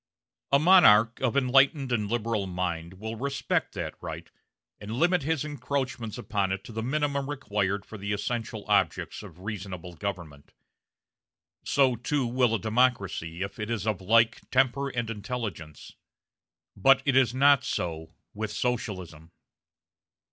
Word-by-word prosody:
A 140 - +6
monarch 140 - +6
of 130 0 +1
enlightened 135 +1 +3
and 105 -4 0
liberal 115 -3 -1
mind 90 -1 -3
will 110 +4 -6
respect 140 +3 -2
that - - -4
right, - - -7 0.5
and 105 +2 -6
limit 175 +5 +3
his 155 0 -1
encroachments 130 -5 -3
upon 100 -3 -1
it 95 0 -3
to - - -10
the 115 0 -4
minimum 140 +2 -1
required 105 -8 -2
for 110 - -10
the 100 +1 -4
essential 110 +1 -3
objects - - +1
of 90 -4 -13
reasonable 95 -4 -6
government; 85 -6 -6 1.1
so, 135 -3 +3
too, 130 +3 -1
will 120 -1 +2
a - - -1
democracy 100 -7 0
if 100 +6 -7
it 105 +1 -4
is 110 -4 -2
of 105 -4 -1
like 115 +4 +2
temper 135 +2 +2
and 120 -3 -3
intelligence. 105 - -6 0.8
But 135 0 +4
it 135 -2 +2
is 130 -2 +4
not 140 0 +5
so 80 -1 -4 0.2
with 110 0 -4
Socialism. 95 -9 -3
115 Hz, 140 wpm, -27 LUFS, 100-130 Hz, 1.1 s, A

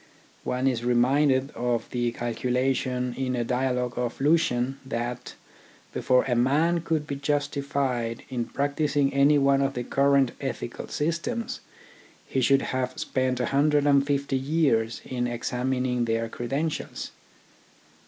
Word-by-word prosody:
One 125 +1 -1
is 125 -3 +1
reminded 130 +3 +3
of 120 0 -1
the 120 -1 0
calculation 125 +1 -1
in 130 -1 -1
a 120 - 0
dialogue 125 0 -1
of 120 -1 -3
Lucian 135 -3 +2
that, 120 -1 -4 0.6
before 125 0 +3
a 125 - -1
man 155 +8 +2
could 160 -2 -1
be 145 - -4
justified 140 -4 -1
in 120 -3 -2
practising 145 0 0
any 140 +2 +5
one 140 0 +3
of 135 0 0
the 125 - -2
current 140 -1 +3
ethical 130 -3 -5
systems, 170 +10 -2 0.7
he 130 - -1
should 135 +2 +4
have 130 0 -2
spent 130 -1 -1
a 125 - +1
hundred 145 +1 +3
and 140 -1 +5
fifty 140 -1 0
years 130 -6 +1
in 125 -1 -2
examining 125 +1 -1
their 115 0 0
credentials. 140 +8 -3
130 Hz, 135 wpm, -26 LUFS, 125-140 Hz, 0.7 s, any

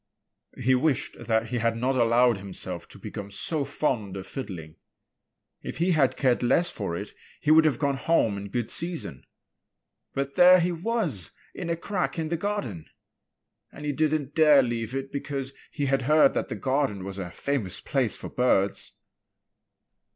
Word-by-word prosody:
He 130 +1 +3
wished 135 +2 +1
that 110 -1 +1
he 120 - -1
had 115 0 +1
not 130 +3 0
allowed 120 -2 +4
himself 100 -1 -6
to - - -13
become 100 -1 -7
so 145 +9 -2
fond 120 -9 -2
of 95 - -6
fiddling. 90 - -7 0.8
If - - -6
he 175 +3 +2
had 145 -6 +2
cared 130 -3 +2
less 165 +8 +3
for 95 -5 -3
it, - - -7 0.3
he 150 - +1
would 160 0 +7
have 155 - +2
gone 140 -2 0
home 130 -7 +2
in 100 0 -6
good 120 +2 -2
season. 165 - -4 0.9
But 140 0 -2
there 180 +2 +8
he 175 +1 +1
was 170 - -1 0.2
in 175 -2 -5
a 170 - 0
crack 185 +1 -2
in 160 -1 -2
the 170 - 0
garden! 150 - -3 0.8
And 150 - -9
he 145 - 0
didn't 150 -1 0
dare 150 -4 +6
leave 120 0 -3
it 135 0 -4
because 140 -1 -4 0.2
he 145 - -2
had 135 0 +1
heard 150 +2 +5
that - - -2
the - - -3
garden 130 -8 0
was 95 0 -5
a 90 -2 -4
famous 115 -2 -2
place 130 -7 0
for - - -7
birds. 100 -6 +1
135 Hz, 175 wpm, -26 LUFS, 115-155 Hz, 0.9 s, there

